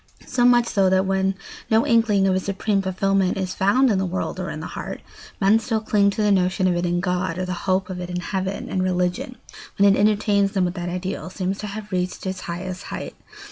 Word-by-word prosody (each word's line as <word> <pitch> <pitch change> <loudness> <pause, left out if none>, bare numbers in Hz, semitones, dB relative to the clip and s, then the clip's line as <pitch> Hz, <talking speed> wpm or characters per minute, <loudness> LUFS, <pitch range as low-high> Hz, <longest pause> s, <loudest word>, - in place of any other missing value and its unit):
So 245 -1 +1
much 240 -1 +5
so 195 -4 +2
that 190 0 +3
when 190 0 +1 0.3
no 220 +1 +4
inkling 225 -4 +3
of 190 - +3
a 185 - +2
supreme 200 +1 -1
fulfilment 195 0 +1
is 185 -1 -2
found 235 +8 +3
in 195 - +1
the 190 - 0
world 180 +2 -3
or - - -3
in - - -5
the - - -6
heart, - - -6 0.4
men 200 +3 +4
still 225 0 -1
cling 210 -2 +2
to 210 +2 -1
the 210 - +3
notion 185 0 +2
of 180 - +2
it 175 +1 0
in 175 0 0
God 180 -1 -1
or 185 - -2
the 180 - -3 0.2
hope 185 0 +2
of 185 -1 -6
it 180 0 -5
in 180 0 -3
heaven, 190 +2 -3
and 185 - -1
religion, 180 +5 -1 0.4
when 200 0 +6
it - - -1
entertains 205 -1 +2
them 190 -3 +2
with 175 - -2
that 175 -1 -4
ideal, 180 -2 -4
seems 190 +1 -3
to 210 - -4
have 210 +1 -7
reached 180 0 -2
its 190 0 -3
highest 180 +2 -5
height. - - -6
190 Hz, 235 wpm, -23 LUFS, 185-205 Hz, 0.4 s, when